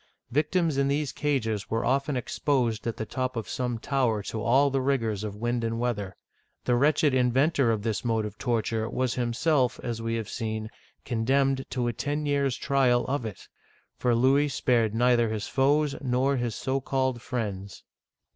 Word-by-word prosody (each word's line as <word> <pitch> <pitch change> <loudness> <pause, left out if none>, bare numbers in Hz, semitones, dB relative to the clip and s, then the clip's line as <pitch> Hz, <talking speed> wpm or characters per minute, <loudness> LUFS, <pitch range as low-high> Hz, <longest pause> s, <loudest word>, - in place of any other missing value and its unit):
Victims 155 +2 +1
in 140 - +2
these 140 -1 0
cages 115 -9 -1
were 115 +1 -1
often 135 +2 +1
exposed 120 -3 -1
at 115 - -3
the 110 - -3
top 130 +2 -3
of 115 -2 -4
some 125 -2 -2
tower 115 -4 0
to 110 +2 -4
all 135 +5 +3
the 135 0 +1
rigors 115 -7 0
of 105 -2 -4
wind 120 +2 -1
and 115 0 -1
weather. 105 -6 -2 0.5
The 125 - +2
wretched 145 +3 +3
inventor 130 +2 +3
of 110 -2 -1
this 110 +2 -1
mode 115 -3 0
of 105 0 -8
torture, 115 -2 -1
was 130 -1 -1
himself, 125 +2 +1
as 115 -2 -3
we 115 0 -1
have 110 -2 -3
seen, 110 -1 -4 0.3
condemned 135 +3 +1
to 125 -2 -1
a 120 - -1
ten 145 +6 -2
years* 140 -3 +1
trial 130 -4 +2
of 130 -3 -2
it; 105 - -10 0.5
for 120 -1 +1
Louis 135 +5 +4
spared 120 -5 +1
neither 120 -1 +3
his 110 -1 -3
foes 145 +2 +2
nor 130 +1 +1
his 120 -4 -2
so 135 +1 -1
called 130 -2 -1
friends. 100 -6 -4
125 Hz, 175 wpm, -27 LUFS, 115-135 Hz, 0.5 s, Louis